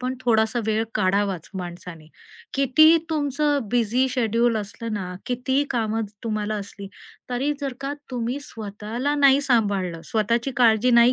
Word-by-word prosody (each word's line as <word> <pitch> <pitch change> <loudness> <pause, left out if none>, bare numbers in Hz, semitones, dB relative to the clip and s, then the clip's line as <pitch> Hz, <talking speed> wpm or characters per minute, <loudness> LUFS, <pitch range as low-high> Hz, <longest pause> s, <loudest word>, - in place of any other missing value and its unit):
पण 255 +1 -2
थोडासा 225 -1 +2
वेळ 220 0 +1
काढावाच 195 -3 0
माणसाने. 175 -2 -8 0.5
कितीही 310 +5 +5
तुमचं 290 -4 0
बिझी 245 +2 +2
शेड्यूल 235 -1 +1
असलं 225 +2 -5
ना, 185 -3 -4
कितीही 255 +3 0
कामं 225 -3 -1
अ, - - 0 0.2
तुम्हाला 215 -1 -2
असली, 200 -1 -7 0.4
तरी 260 +4 0
जर 275 -2 -2
का 275 +1 -3 0.2
तुम्ही 245 +2 -2
स्वतःला 225 +2 -4
नाही 280 -1 +5
सांभाळलं, 200 -10 0
स्वतःची 230 +4 0
काळजी 235 0 +4
नाही 235 +1 +6
230 Hz, 140 wpm, -23 LUFS, 210-260 Hz, 0.5 s, नाही